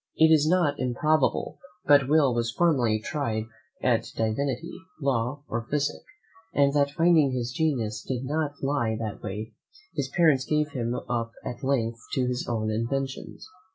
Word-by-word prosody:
It 160 0 +6
is 155 -1 +4
not 160 -4 +2
improbable 135 +4 +1 0.3
but 145 -2 +5
Will 145 -4 +4
was 120 -1 0
formerly 125 -7 +2
tried 110 -3 -2 0.4
at 115 -3 +2
divinity, 130 +8 -1 0.3
law, 135 0 -1
or 115 0 -3
physick; 145 -1 -1 0.5
and 140 -1 +4
that 140 -1 +3
finding 160 -3 +3
his 120 -1 -2
genius 120 -10 -1
did 130 +1 -4
not 145 0 -2
lie 120 -6 0
that 110 -3 -5
way, 105 +2 -5 0.4
his 140 -3 -2
parents 150 -4 +3
gave 150 0 +1
him 120 -3 -2
up 115 -1 -2
at 125 - -6
length 115 -4 0
to 130 - +1
his 125 0 -2
own 110 -2 -1
inventions. 135 +5 -3
135 Hz, 155 wpm, -26 LUFS, 115-145 Hz, 0.5 s, It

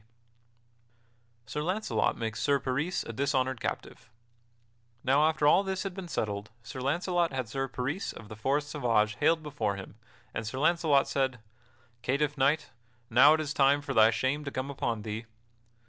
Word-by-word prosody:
[Sidenote: - - -22
Sir 150 - -2
Launcelot 180 - 0
makes 110 -2 -3
Sir 140 +3 +3
Peris 140 +7 -1
a 115 - -7
dishonored 130 -2 0
captive] - - -5 0.9
Now, 140 +4 +4
after 155 -2 0
all 150 - +6
this 190 -1 -3
had 195 -2 -4
been 190 -1 -7
settled, 105 -8 -3
Sir 130 +2 -7
Launcelot 175 +5 +1
had 130 -3 -2
Sir 135 +4 -2
Peris 135 +8 -3
of 110 - -11
the 110 - -9
Forest 140 +6 0
Sauvage 115 -7 +1
haled 160 +1 +2
before 120 -9 -2
him, 95 -1 -9 0.4
and 110 0 -4
Sir 120 - -5
Launcelot 155 -2 +3
said: 130 -3 0 0.6
"Catiff 140 +3 0
Knight, 150 +3 +1 0.4
now 140 +6 +7
is 155 -2 -3
it - - -5
time 140 +1 +4
for - - -3
thy 110 0 +6
shame 130 +6 0
to 140 - -4
come 135 +1 -4
upon 115 -5 -2
thee." 110 +1 -5
135 Hz, 170 wpm, -29 LUFS, 115-150 Hz, 0.9 s, now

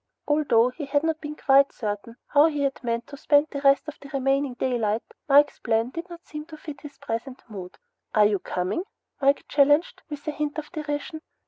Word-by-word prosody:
Although 280 -6 +3
he 285 +4 -6
had 285 +1 +1
not 320 0 -1
been 300 -1 -6
quite 275 -1 +4
certain 210 +1 -5
how 290 +2 +6
he 295 -3 -1
had 275 -1 -2
meant 235 -1 -1
to 280 - -10
spend 290 +2 +3
the 280 - -4
rest 275 +2 +4
of 305 - -8
the 280 - -12
remaining 270 -1 0
daylight, 230 -4 0 0.3
Mike's 290 +1 +5
plan 230 +1 0
did 335 +5 -6
not 345 0 -11
seem 300 0 -7
to 315 -1 -11
fit 295 -3 -9
his 295 -1 -11
present 255 -1 -5
mood. 190 -5 -9 0.4
"Are 210 -1 +6
you 205 -2 +2
coming?" 180 - -2 0.4
Mike 275 +1 +3
challenged, 290 +3 +3
with 295 -1 -8
a - - +1
hint 300 0 -3
of 305 -1 -6
derision. 305 0 -4
280 Hz, 205 wpm, -25 LUFS, 245-300 Hz, 0.4 s, how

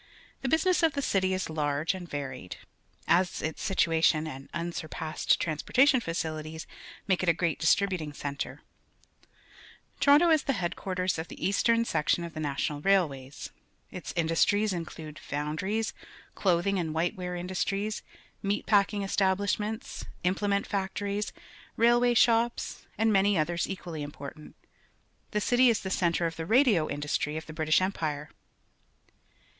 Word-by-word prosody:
The 265 - -1
business 350 +5 +3
of 325 -3 +3
the 280 - -1
city 190 -4 +1
is 185 0 -1
large 150 +1 0
and 180 -2 -8
varied, 130 -9 -5 0.5
as 175 +1 +2
its 160 - -3
situation 165 -4 +2
and 135 -3 -8
unsurpassed 165 -2 -1
transporta 170 - +2
tion 265 -3 +5
facilities 160 -4 -4 0.4
make 190 -2 +2
it 185 - +2
a - - +6
great 165 -1 -1
distributing 180 -2 +2
centre. 140 -1 -5 1.4
Toronto 300 +4 +6
is 310 -2 +5
the 275 - +1
headquarters 180 0 -2
of 160 - -4
tiie. - - -9
eastern 230 +4 +2
section 160 -1 +1
of 170 -1 -6
the 155 - -6
National 145 0 -2
Railways^ 150 -8 0 0.4
Its 180 - -6
industries 185 +5 +2
include 160 -3 -7
foundries, 155 +10 -2 0.4
clothing 190 +1 +1
aiwL 165 -4 -2
white 165 +2 0
wear 180 -1 -4
industries, 195 +4 -2 0.4
mg^trPf^king 205 0 +2
estah 190 -1 +2
Ushments, 210 +2 -3 0.2
implement 200 +2 +1
factorie 200 +1 -2
s, 210 - -3 0.5
railway 240 +1 +4
shops, 235 +1 +2
and 220 +1 +3
many 195 0 +4
others 170 +2 0
equally 175 -5 -5
important. 145 +1 -9 0.7
The 210 - 0
cit} 245 +4 +1
is 245 -4 +5
the 190 - -4
centre 170 -2 +1
of 165 0 -3
t - - -4
he 160 - -9
radi 250 -1 +5
o 155 -2 +1
indu 145 +1 -4
stry^f 150 +1 -1
t - - -16
he 155 - -9
Br 155 0 -2
itish 155 +3 +4
Empire. 155 -6 -2
180 Hz, 150 wpm, -29 LUFS, 155-205 Hz, 1.4 s, a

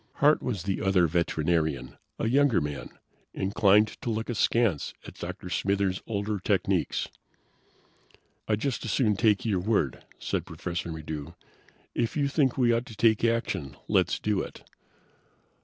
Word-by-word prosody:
Hart 150 +2 +4
was 105 -9 -3
the 95 0 -2
other 95 -3 +4
veterinarian, 80 -5 0 0.2
a - - -1
younger 135 -2 +4
man, 75 -4 -4 0.5
inclined 105 +2 +3
to - - -3
look 110 +2 -2
askance 115 -7 +1
at - - -9
Dr. - - -7
Smithers' 100 -1 0
older 105 -1 -2
techniques. - - 0 1.4
"I'd 105 -1 0
just 135 -2 -1
as 115 - -4
soon 110 -4 +2
take 110 +2 +2
your 100 -5 +1
word," 90 - 0
said - - -2
Professor 85 -1 -5
Maddox. 80 0 -6 0.6
"If 120 +5 -1
you 140 -1 +2
think 140 -3 +2
we 120 -2 +4
ought 115 +1 -1
to 110 - -10
take 110 0 +3
action, 115 - 0
let's - - +2
do 105 -2 0
it." - - -9
105 Hz, 145 wpm, -28 LUFS, 85-115 Hz, 1.4 s, Hart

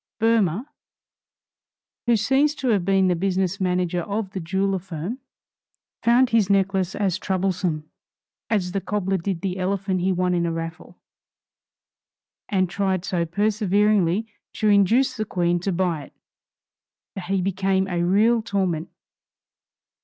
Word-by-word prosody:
Boehmer, 225 -2 +2 1.4
who 235 - +5
seems 275 +7 +2
to 265 -3 -2
have 205 -5 +2
been 195 0 +3
the 180 - +2
business 190 +1 -1
manager 180 -1 0
of 200 +2 -3
the 195 - -4
jeweler 190 +3 -1
firm, 180 - -6 0.8
found 245 +2 +4
his 220 -4 +3
necklace 195 -2 +1
as 190 -3 0
troublesome 185 -5 -1 0.6
as 190 -5 0
the 195 +1 -2
cobbler 195 -1 -1
did 175 -1 -3
the 190 -1 -3
elephant 190 0 -1
he 190 +2 +1
won 180 0 +1
in 170 -1 +1
a - - -1
raffle, 165 +1 -7 1.5
and 185 -3 +2
tried 190 0 -1
so 170 -2 -1
perseveringly 205 0 +2 0.3
to 215 - +1
induce 225 +6 +3
the 215 - -2
Queen 175 -4 0
to 195 +3 -2
buy 170 -5 -1
it, - - -20 1.0
that 190 - -6
he 195 +1 0
became 190 +1 0
a 175 -2 -1
real 215 +6 +3
torment. 190 -7 -1
190 Hz, 140 wpm, -23 LUFS, 180-205 Hz, 1.5 s, who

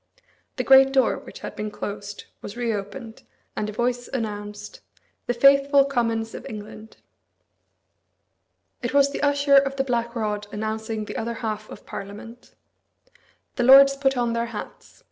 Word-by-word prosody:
The - - -2
great 270 0 +7
door, 265 -1 +2
which - - -12
had - - -7
been 210 0 -4
closed, 205 0 -7 0.2
was 205 - -8
reopened; 225 0 -4 0.3
and 210 - -2
a - - -4
voice 245 +2 -2
announced, 210 -3 -6 0.5
"The 245 - +1
faithful 275 +2 +5
Commons 230 -4 -1
of - - -8
England." 215 +1 -10 1.8
It - - -3
was 280 0 +4
the - - -5
Usher 285 -1 +4
of 275 0 +2
the 270 - 0
Black 235 -2 -2
Rod 210 -2 -2
announcing 220 0 -4
the - - -6
other 235 +1 -3
half 215 -1 -4
of - - -12
Parliament. 210 +4 -10 1.0
The 245 - +1
lords 275 +2 +8
put 270 -1 0
on 240 -1 0
their 235 0 -1
hats. 225 -3 -9
235 Hz, 150 wpm, -24 LUFS, 215-270 Hz, 1.8 s, lords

